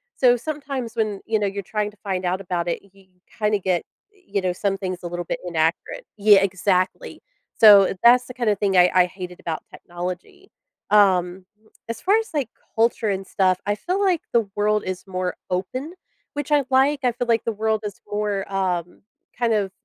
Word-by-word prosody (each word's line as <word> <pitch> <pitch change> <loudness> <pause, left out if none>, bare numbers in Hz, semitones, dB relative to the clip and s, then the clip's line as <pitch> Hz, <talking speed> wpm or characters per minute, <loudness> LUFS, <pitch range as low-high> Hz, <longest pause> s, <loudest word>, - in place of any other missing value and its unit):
So, 245 -2 +5
sometimes 275 -4 -5
when, 215 -3 -1
you 220 -1 +2
know, 205 - 0
you're 200 0 -4
trying 210 +2 -2
to 210 - -24
find 190 -2 -2
out 185 +2 -1
about 175 -2 -3
it, 170 - -2
you 195 -1 -21 0.3
kinda 210 -1 +1
get, 185 -2 -1 0.3
you 370 - -4
know, 185 -1 0
some 195 +1 -1
things 185 -2 -5
a - - -3
little 175 0 -4
bit - - -3
inaccurate. 165 - -1
Yeah, 205 -1 +6
exactly. 190 - -1 0.4
So, 205 -3 +8
that's 245 +1 +6
the 250 - -8
kind 240 -3 -1
of 205 - 0
thing 195 -2 +1
I 180 0 +7
I 180 -1 +5
hated 180 0 -9
about 160 -2 -4
technology. 180 - -8 0.4
Um, 185 -3 +3 0.4
as 230 - -5
far 400 +3 +3
as, 450 -4 -4
like, 280 -7 -1 0.3
culture 225 -1 +1
and 195 -1 -2
stuff, 185 -1 +1
I 205 - 0
feel 360 - -2
like 365 -5 +2
the 230 -4 +2
world 210 0 +2
is 185 -1 -5
more 185 -1 -3
open, 255 - -3 0.4
which 290 0 -5
I 290 -2 +3
like; 270 +2 +3
I 245 - +4
feel 245 +1 -3
like 230 -1 +2
the 230 - 0
world 220 +1 0
is 205 -2 -7
more, 205 -2 -2
um, 180 -3 -2 0.3
kind 235 -2 +1
of 200 -3 0
205 Hz, 195 wpm, -22 LUFS, 185-235 Hz, 0.4 s, So